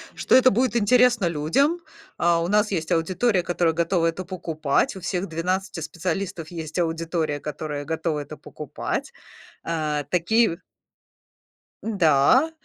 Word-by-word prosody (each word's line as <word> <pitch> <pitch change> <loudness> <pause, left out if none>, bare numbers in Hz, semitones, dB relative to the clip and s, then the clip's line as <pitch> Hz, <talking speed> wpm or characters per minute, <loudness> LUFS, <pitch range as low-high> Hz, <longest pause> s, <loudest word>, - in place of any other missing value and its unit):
что - - -1
это 255 0 +7
будет 245 +3 +1
интересно 240 0 +4
людям. 170 - +1 0.4
А, 170 -1 +2
у 170 - -1
нас 210 +2 +2
есть 160 -4 -2
аудитория, 185 +4 +1
которая 175 -1 +1
готова 170 +1 +1
это 165 +3 -3
покупать. 165 -4 -1
У 190 - -8
всех 180 +2 -2
12 185 +3 -2
специалистов 170 +2 -4
есть 160 -1 -5
аудитория, 165 -2 -1
которая 150 -1 -5
готова 160 -1 -2
это 150 +1 -8
покупать. 150 - -5 0.5
А, 155 -3 -2
такие 180 +1 +2 1.2
да, 200 - +3
170 Hz, 130 wpm, -24 LUFS, 160-195 Hz, 1.2 s, это